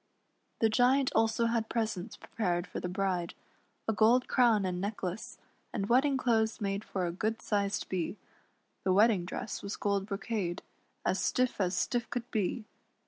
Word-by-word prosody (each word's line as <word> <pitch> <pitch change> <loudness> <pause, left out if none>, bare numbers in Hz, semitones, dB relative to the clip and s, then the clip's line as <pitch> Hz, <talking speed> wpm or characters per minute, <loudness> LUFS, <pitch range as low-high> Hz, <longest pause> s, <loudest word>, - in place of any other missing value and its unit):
The 225 - +5
Giant 255 +4 +3
also 225 +1 +2
had 230 -1 0
presents 220 -3 -2
prepared 175 -5 -2
for - - -6
the 180 - -3
bride, 185 -2 -1 0.5
a 225 - +2
gold 230 +4 +4
crown 230 -6 +4
and 180 -1 -2
necklace, 205 +3 -4 0.3
and 200 -3 -2
wedding 265 +3 +4
clothes 225 -3 +1
made 200 -1 -2
for 185 -4 -2
a 170 - -1
good 215 +6 -2
sized 200 -1 -1
Bee; 185 +2 -2 0.7
the 185 - +3
wedding 205 -2 +4
dress 195 - -5
was 200 +1 -4
gold 200 -2 0
brocade, 195 -3 -3 0.4
as - - +1
stiff 255 -4 +1
as 180 -1 0
stiff 240 -2 0
could 245 0 -4
be. 215 +1 -1
215 Hz, 160 wpm, -31 LUFS, 190-230 Hz, 0.7 s, The